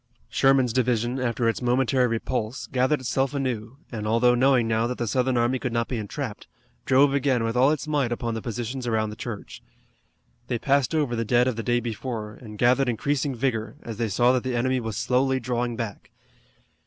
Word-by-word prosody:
Sherman's 135 Hz, -3 st, +3 dB
division, 125 Hz, 0 st, +1 dB
after 120 Hz, -2 st, 0 dB
its 115 Hz, -, 0 dB
momentary 125 Hz, +1 st, +2 dB
repulse, 115 Hz, +1 st, -2 dB
gathered 130 Hz, +2 st, +1 dB
itself 135 Hz, +2 st, 0 dB
anew, 125 Hz, -3 st, -3 dB
and, 105 Hz, -3 st, -4 dB
although 115 Hz, +3 st, +4 dB
knowing 125 Hz, -1 st, +3 dB
now 115 Hz, +1 st, +1 dB
that 125 Hz, -, -4 dB
the 120 Hz, -, -2 dB
Southern 125 Hz, +2 st, +1 dB
army 120 Hz, +2 st, +1 dB
could 125 Hz, -, -3 dB
not 115 Hz, 0 st, 0 dB
be 125 Hz, -, -3 dB
entrapped, 110 Hz, +2 st, -5 dB, 0.4 s
drove 135 Hz, +1 st, +5 dB
again 135 Hz, -4 st, +1 dB
with 115 Hz, +1 st, -1 dB
all 130 Hz, +3 st, +5 dB
its 155 Hz, 0 st, -1 dB
might 145 Hz, -5 st, 0 dB
upon 120 Hz, -1 st, -2 dB
the 110 Hz, -, -4 dB
positions 120 Hz, +2 st, -4 dB
around 110 Hz, -2 st, 0 dB
the -, -, -8 dB
church. 115 Hz, -2 st, -7 dB, 0.9 s
They 120 Hz, -, -1 dB
passed 140 Hz, +3 st, +1 dB
over 145 Hz, -6 st, +1 dB
the 115 Hz, -, -1 dB
dead 120 Hz, +3 st, +3 dB
of 130 Hz, -, 0 dB
the 115 Hz, -, -3 dB
day 120 Hz, +1 st, +1 dB
before, 115 Hz, -2 st, -5 dB
and 105 Hz, -3 st, -10 dB
gathered 125 Hz, +3 st, +3 dB
increasing 135 Hz, +3 st, -1 dB
vigor, 115 Hz, -3 st, -2 dB
as 115 Hz, -3 st, -6 dB
they 115 Hz, -1 st, -1 dB
saw 120 Hz, +5 st, +3 dB
that 130 Hz, -1 st, +1 dB
the 130 Hz, -1 st, -3 dB
enemy 130 Hz, +2 st, +1 dB
was 110 Hz, -4 st, -4 dB
slowly 130 Hz, +1 st, +1 dB
drawing 120 Hz, -1 st, -2 dB
back. 115 Hz, -4 st, -6 dB
120 Hz, 200 wpm, -25 LUFS, 115-130 Hz, 0.9 s, drove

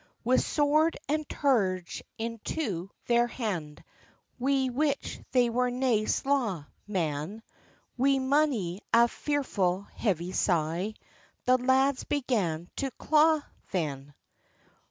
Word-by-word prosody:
With 255 Hz, +2 st, +3 dB
sword 305 Hz, +2 st, +2 dB
and 305 Hz, +1 st, -1 dB
terge 190 Hz, -, 0 dB, 0.2 s
into 225 Hz, -, -3 dB, 0.2 s
their 240 Hz, 0 st, +3 dB
hand, 180 Hz, -, -4 dB, 0.6 s
Wi 265 Hz, 0 st, +2 dB
which 280 Hz, +2 st, -1 dB
they 250 Hz, -2 st, +4 dB
were 250 Hz, +2 st, +1 dB
nae 245 Hz, -4 st, +1 dB
slaw, 235 Hz, -, 0 dB, 0.2 s
man, 180 Hz, +2 st, -2 dB, 0.6 s
Wi 275 Hz, +1 st, +4 dB
mony 260 Hz, -, +1 dB
a 235 Hz, +1 st, +6 dB
fearful 200 Hz, -11 st, -1 dB
heavy 180 Hz, -5 st, -1 dB
sigh, 175 Hz, +4 st, 0 dB, 0.5 s
The 255 Hz, 0 st, +4 dB
lads 260 Hz, +2 st, +2 dB
began 200 Hz, -, -1 dB
to 275 Hz, -, -1 dB
claw 310 Hz, 0 st, +4 dB, 0.3 s
then. 145 Hz, -5 st, -3 dB
235 Hz, 105 wpm, -29 LUFS, 185-275 Hz, 0.6 s, a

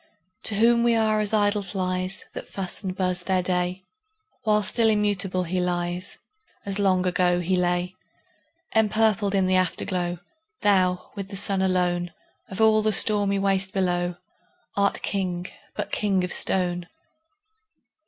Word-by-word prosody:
To 215 Hz, -, +2 dB
whom 235 Hz, +3 st, +4 dB
we 235 Hz, -1 st, +3 dB
are 215 Hz, -1 st, +2 dB
as 210 Hz, -1 st, +1 dB
idle 205 Hz, -1 st, +2 dB
flies, 185 Hz, -1 st, -2 dB
That -, -, -7 dB
fuss 190 Hz, -2 st, -2 dB
and 185 Hz, -3 st, -4 dB
buzz 180 Hz, -1 st, 0 dB
their 185 Hz, 0 st, 0 dB
day; 180 Hz, +1 st, -1 dB, 0.6 s
While 210 Hz, -1 st, +2 dB
still 225 Hz, +3 st, +2 dB
immutable 200 Hz, -3 st, +1 dB
he 180 Hz, +1 st, -2 dB
lies, 175 Hz, +1 st, -1 dB, 0.5 s
As 200 Hz, 0 st, -2 dB
long 185 Hz, -2 st, +2 dB
ago 180 Hz, -1 st, +2 dB
he 180 Hz, +2 st, 0 dB
lay. 180 Hz, 0 st, 0 dB, 0.8 s
Empurpled 215 Hz, -2 st, +2 dB
in 190 Hz, -1 st, +3 dB
the 185 Hz, 0 st, +3 dB
Afterglow, 180 Hz, -1 st, -1 dB, 0.4 s
Thou, 185 Hz, -3 st, +2 dB
with 200 Hz, -2 st, -6 dB
the 195 Hz, -, -8 dB
Sun 195 Hz, 0 st, +1 dB
alone, 180 Hz, -2 st, 0 dB, 0.4 s
Of 190 Hz, -, -7 dB
all 220 Hz, -1 st, +5 dB
the 215 Hz, 0 st, +2 dB
stormy 205 Hz, -1 st, +2 dB
waste 195 Hz, 0 st, 0 dB
below, 175 Hz, -2 st, 0 dB, 0.6 s
Art 200 Hz, 0 st, +1 dB
King, 180 Hz, -3 st, -2 dB, 0.3 s
but -, -, -4 dB
king 195 Hz, -3 st, +1 dB
of 180 Hz, -, -2 dB
stone! 175 Hz, -2 st, 0 dB
190 Hz, 145 wpm, -25 LUFS, 180-205 Hz, 0.8 s, all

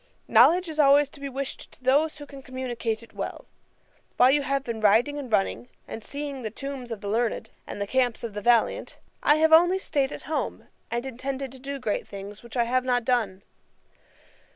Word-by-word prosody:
Knowledge 315 Hz, +11 st, +5 dB
is 310 Hz, -1 st, -6 dB
always 285 Hz, 0 st, +6 dB
to 280 Hz, -, -15 dB
be 280 Hz, 0 st, -5 dB
wished 270 Hz, +1 st, -6 dB
to -, -, -19 dB
those 290 Hz, +5 st, +3 dB
who 290 Hz, -, -9 dB
can 280 Hz, -1 st, -11 dB
communicate 240 Hz, -4 st, -4 dB
it 230 Hz, -, -17 dB
well. -, -, -5 dB, 0.7 s
While 250 Hz, +1 st, +6 dB
you 290 Hz, +1 st, +3 dB
have 275 Hz, -1 st, -1 dB
been 230 Hz, -4 st, -5 dB
riding 230 Hz, +8 st, +3 dB
and 260 Hz, -5 st, -7 dB
running, 215 Hz, +4 st, 0 dB, 0.2 s
and 225 Hz, -, -7 dB
seeing 280 Hz, 0 st, -5 dB
the 220 Hz, -, -3 dB
tombs 260 Hz, +1 st, -7 dB
of 220 Hz, -3 st, -5 dB
the 205 Hz, -, -6 dB
learned, 225 Hz, +3 st, -1 dB, 0.2 s
and -, -, -6 dB
the 200 Hz, -, -1 dB
camps 245 Hz, +1 st, 0 dB
of 230 Hz, -3 st, -4 dB
the 210 Hz, -, -4 dB
valiant, 235 Hz, +1 st, +2 dB, 0.2 s
I 295 Hz, -, +5 dB
have 320 Hz, +1 st, +3 dB
only 350 Hz, +3 st, +6 dB
staid 285 Hz, -7 st, -1 dB
at -, -, -8 dB
home, 310 Hz, -, -3 dB, 0.2 s
and 240 Hz, +2 st, -2 dB
intended 265 Hz, +1 st, -4 dB
to 260 Hz, -, -11 dB
do 280 Hz, +2 st, -5 dB
great 225 Hz, -6 st, -2 dB
things, 200 Hz, +1 st, -8 dB
which 235 Hz, +1 st, -9 dB
I 240 Hz, -, +4 dB
have 250 Hz, +2 st, +1 dB
not 245 Hz, -2 st, 0 dB
done. 215 Hz, -7 st, 0 dB
255 Hz, 205 wpm, -26 LUFS, 230-280 Hz, 0.7 s, always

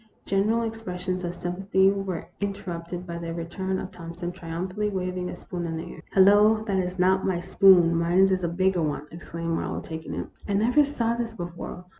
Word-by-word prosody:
General 215 Hz, +4 st, +2 dB
expressions 185 Hz, -5 st, -4 dB
of 175 Hz, 0 st, -3 dB
sympathy 190 Hz, +2 st, +2 dB
were 195 Hz, -2 st, -2 dB
here -, -, -17 dB
in 200 Hz, 0 st, -1 dB
terrupted 175 Hz, -1 st, -6 dB
by 170 Hz, -1 st, -5 dB
the 165 Hz, -1 st, -5 dB
return 190 Hz, +3 st, -3 dB
of 185 Hz, -, -5 dB
Thompson, 170 Hz, +1 st, -6 dB
triumphantly 185 Hz, +5 st, -3 dB
waving 185 Hz, -2 st, -3 dB
a -, -, -5 dB
spoon 175 Hz, -1 st, -5 dB
in 165 Hz, -1 st, -3 dB
the 170 Hz, +1 st, -6 dB
air. -, -, -12 dB
" -, -, -32 dB
Hello! 205 Hz, +3 st, +6 dB
that 195 Hz, -3 st, +1 dB
's 180 Hz, -, -11 dB
not 190 Hz, +1 st, +3 dB
my 185 Hz, -2 st, 0 dB
spoon; 175 Hz, -2 st, +5 dB
mine 170 Hz, +1 st, +1 dB
is 190 Hz, -1 st, +3 dB
a -, -, +2 dB
bigger 185 Hz, +1 st, +1 dB
one," 150 Hz, -1 st, -2 dB
exclaimed 165 Hz, 0 st, -5 dB
Marlowe, -, -, -2 dB
taking 160 Hz, 0 st, -6 dB
it. -, -, -4 dB
" -, -, -15 dB
I -, -, +1 dB
never 240 Hz, +9 st, +4 dB
saw 235 Hz, -5 st, 0 dB
this 235 Hz, -1 st, -3 dB
before. 175 Hz, 0 st, -7 dB
185 Hz, 210 wpm, -26 LUFS, 170-195 Hz, -, Hello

